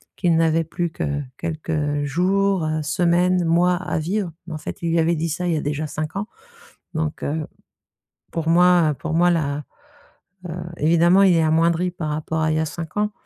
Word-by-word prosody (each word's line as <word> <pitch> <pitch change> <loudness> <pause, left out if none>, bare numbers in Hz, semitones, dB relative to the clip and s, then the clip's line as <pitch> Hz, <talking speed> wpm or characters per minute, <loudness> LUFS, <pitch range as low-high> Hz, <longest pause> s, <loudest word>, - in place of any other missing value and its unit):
qu'il 170 -2 +2
n'avait 165 0 +2
plus 170 +1 -3
que 145 -3 -2 0.2
quelques 155 -3 -2
jours, 190 +5 +1
heu, 155 0 -1
semaines, 175 +3 +2
mois 175 +2 +3
à 175 -2 -3
vivre 180 +3 -2 0.2
mais 170 - -6
en - - -3
fait, - - -7
il 170 -1 -1
lui 165 - +2
avait 165 +1 +2
dit, 165 +1 -1
ça 175 +3 -2
il 175 - +1
y - - 0
a - - -1
déjà 150 +1 -2
5 155 +3 -5
ans 205 +2 -3 0.7
donc 155 -1 -3
heu, 155 +1 -2 0.9
pour 165 -1 -2
moi, 175 -1 +5
heu, - - -5
pour 160 - -5
moi, 175 +2 +4
la, 150 -3 -1 0.9
heu, - - -4 0.2
évidemment, 170 +4 +4
il 185 -3 +5
est 165 - +3
amoindri 165 +3 +2
par 170 -3 -5
rapport 155 +1 -2
à 155 0 +1
il 155 - +1
y - - +1
a 160 - +1
5 165 +3 -7
ans, 210 0 +1
165 Hz, 210 wpm, -22 LUFS, 155-175 Hz, 0.9 s, moi